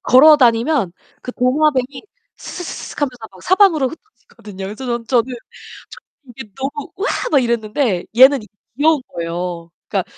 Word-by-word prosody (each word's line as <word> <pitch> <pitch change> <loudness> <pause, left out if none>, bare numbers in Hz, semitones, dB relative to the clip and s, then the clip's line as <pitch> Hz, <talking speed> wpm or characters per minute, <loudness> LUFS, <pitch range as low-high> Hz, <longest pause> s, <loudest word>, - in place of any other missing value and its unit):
걸어 300 +5 +7
다니면 235 - +2 0.3
그 250 - -6
도마뱀이 265 +1 0 0.3
스스스스슥하면서 290 -6 -5 0.2
막 185 - -16
사방으로 365 -8 +3
흩어지거든요. 215 - -12
그래서 215 +6 -7
전 240 -1 -3
저는 250 0 +1 0.6
전 - - -12 0.3
이게 230 -3 -11
너무 275 +2 -5
"우와." 395 - -2 0.2
막 280 -3 +4
이랬는데 230 -3 -1
얘는 265 0 +7
이게 210 - -17 0.2
귀여운 300 0 +2
거예요. 170 0 -5 0.2
그니까 195 -3 -1
255 Hz, 355 characters per minute, -18 LUFS, 215-290 Hz, 0.6 s, 걸어